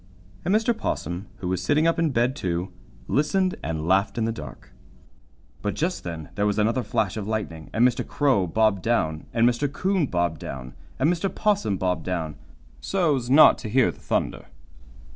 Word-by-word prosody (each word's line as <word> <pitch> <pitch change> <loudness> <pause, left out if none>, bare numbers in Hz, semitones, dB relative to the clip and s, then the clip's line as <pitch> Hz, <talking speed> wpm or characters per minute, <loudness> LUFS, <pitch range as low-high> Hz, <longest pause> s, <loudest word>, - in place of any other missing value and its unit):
And 180 - 0
Mr. 225 +2 +2
'Possum, 90 - -3
who 90 - -3
was 90 0 -1
sitting 145 - +2
up 165 0 +2
in 165 -1 +2
bed, 125 0 +1
too, 90 -6 -3 0.3
listened 185 +6 +1
and 80 -1 -3
laughed 95 +5 +2
in 115 - +1
the 115 - 0
dark. 75 - -10 0.9
But 105 - -2
just 175 +4 -2
then 80 -3 -6
there 105 +1 0
was 105 - 0
another 115 +4 +2
flash 110 -3 -1
of 105 -2 -4
lightning, 100 -8 -4
and 120 +3 +4
Mr. 125 - -1
Crow 130 -11 +2
bobbed 110 +1 +2
down, 80 -9 0
and 115 0 +3
Mr. 125 +4 0
'Coon 185 0 0
bobbed 85 - -1
down, 65 0 -7 0.2
and 135 - +2
Mr. 180 +3 -1
'Possum 205 - 0
bobbed 90 -1 -1
down, 85 -4 -2 0.5
so's 145 - 0
not 145 +4 +7
to 110 - -6
hear 130 +2 +3
the - - -18
thunder. - - -2
110 Hz, 180 wpm, -25 LUFS, 90-145 Hz, 0.9 s, not